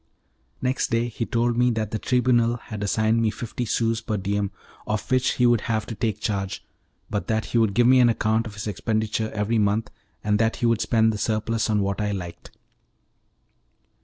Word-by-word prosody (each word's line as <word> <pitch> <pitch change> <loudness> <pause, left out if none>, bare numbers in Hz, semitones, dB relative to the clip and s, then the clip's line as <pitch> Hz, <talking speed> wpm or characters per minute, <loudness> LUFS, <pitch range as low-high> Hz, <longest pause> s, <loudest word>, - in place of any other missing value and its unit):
Next 130 +1 +1
day 115 +1 0
he 115 0 -4
told 120 0 +1
me 125 0 +4
that 110 -3 -2
the 110 - -2
Tribunal 120 -1 +2
had 110 -3 -8
assigned 110 +2 +1
me 110 - +2
fifty 120 +2 -5
sous 115 0 0
per 110 -2 -2
diem 100 +1 -1 0.4
of 110 +4 -3
which 130 0 +3
he 125 - +2
would 120 -3 +4
have 110 -2 0
to 115 - -6
take 110 -1 -2
charge, 100 -2 -3 0.5
but 105 - -2
that 110 -2 0
he 120 - 0
would 110 -4 +2
give 120 - +4
me 130 +1 +6
an 120 -1 +6
account 110 0 +1
of 105 - -10
his 105 - -6
expenditure 110 +1 -1
every 110 +2 0
month, 105 +2 +1 0.3
and 105 0 +1
that 115 0 +2
he - - -2
would 115 -1 +2
spend 110 -1 +3
the 105 - -5
surplus 110 +1 0
on 105 -1 +2
what 100 +1 -1
I 105 -1 -1
liked. 85 -3 -7
110 Hz, 200 wpm, -24 LUFS, 105-115 Hz, 0.5 s, me